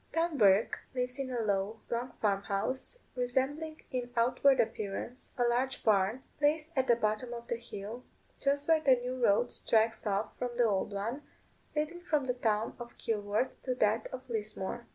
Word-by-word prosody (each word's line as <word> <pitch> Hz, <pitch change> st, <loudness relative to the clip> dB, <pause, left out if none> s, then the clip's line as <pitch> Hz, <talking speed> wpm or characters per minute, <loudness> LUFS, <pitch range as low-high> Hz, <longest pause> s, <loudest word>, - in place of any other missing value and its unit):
Tom 330 Hz, -1 st, +1 dB
Bourke 205 Hz, -4 st, +4 dB, 0.2 s
lives 250 Hz, +1 st, -1 dB
in 270 Hz, -1 st, -2 dB
a 245 Hz, -2 st, -1 dB
low, 205 Hz, +1 st, 0 dB
long 240 Hz, +1 st, -2 dB
farm 200 Hz, -2 st, +1 dB
house, 255 Hz, -, -2 dB
resembling 270 Hz, +6 st, -1 dB
in 250 Hz, -2 st, -2 dB
outward 255 Hz, +3 st, +4 dB
appearance 215 Hz, +4 st, -2 dB
a 245 Hz, -, +3 dB
large 250 Hz, +3 st, +1 dB
barn, 215 Hz, +4 st, +3 dB, 0.2 s
placed 305 Hz, +1 st, +2 dB
at 265 Hz, -1 st, +2 dB
the 240 Hz, -, +6 dB
bottom 230 Hz, +2 st, -1 dB
of 235 Hz, 0 st, -8 dB
the 235 Hz, -, +1 dB
hill, 230 Hz, 0 st, -7 dB, 0.4 s
just 280 Hz, +1 st, +1 dB
where 320 Hz, -1 st, +5 dB
the 270 Hz, -4 st, +6 dB
new 250 Hz, +1 st, -4 dB
road 205 Hz, +3 st, +4 dB
strikes 225 Hz, 0 st, +2 dB
off 205 Hz, +1 st, -1 dB
from 245 Hz, -1 st, -3 dB
the 245 Hz, -, +5 dB
old 205 Hz, -2 st, +1 dB
one, 220 Hz, +8 st, -3 dB, 0.5 s
leading 305 Hz, +4 st, -1 dB
from 305 Hz, -5 st, +1 dB
the 250 Hz, -, +1 dB
town 220 Hz, -3 st, 0 dB
of 240 Hz, 0 st, -9 dB
Kilworth 210 Hz, +2 st, 0 dB
to 255 Hz, -1 st, -1 dB
that 220 Hz, -1 st, +2 dB
of 260 Hz, 0 st, -7 dB
Lismore. 215 Hz, 0 st, -4 dB
240 Hz, 175 wpm, -32 LUFS, 215-265 Hz, 0.5 s, the